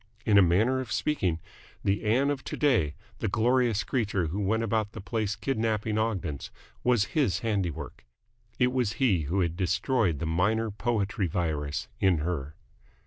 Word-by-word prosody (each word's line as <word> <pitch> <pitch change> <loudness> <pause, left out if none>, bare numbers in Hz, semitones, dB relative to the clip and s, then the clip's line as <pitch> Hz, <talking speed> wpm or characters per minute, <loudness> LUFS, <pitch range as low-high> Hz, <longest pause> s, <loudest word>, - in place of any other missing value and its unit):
In 105 - +3
a - - +8
manner 105 +9 +3
of 125 -3 -5
speaking 105 - 0 0.4
the 100 +2 +1
Ann 130 +7 +3
of 140 -2 -3
to - - -4
day, 105 - +2 0.2
the 115 - -1
glorious 120 +1 +2
creature 105 -8 0
who 85 +6 -3
went 110 +3 +1
about 110 -1 0
the - - -7
place 105 +2 -2
kidnapping 110 -4 -1
Ogdens, 95 -10 -2 0.3
was 120 -5 +3
his 140 - +1
handiwork. 100 - -3 0.5
It 125 0 +3
was 125 -5 0
he 100 - +2
who 90 +7 0
had 85 -2 0
destroyed 90 - +1
the 85 - -3
minor 105 +7 +1
poetry 100 -2 -1
virus 75 -5 -2
in 95 -3 +3
her. 75 -2 -3
105 Hz, 160 wpm, -28 LUFS, 90-115 Hz, 0.5 s, a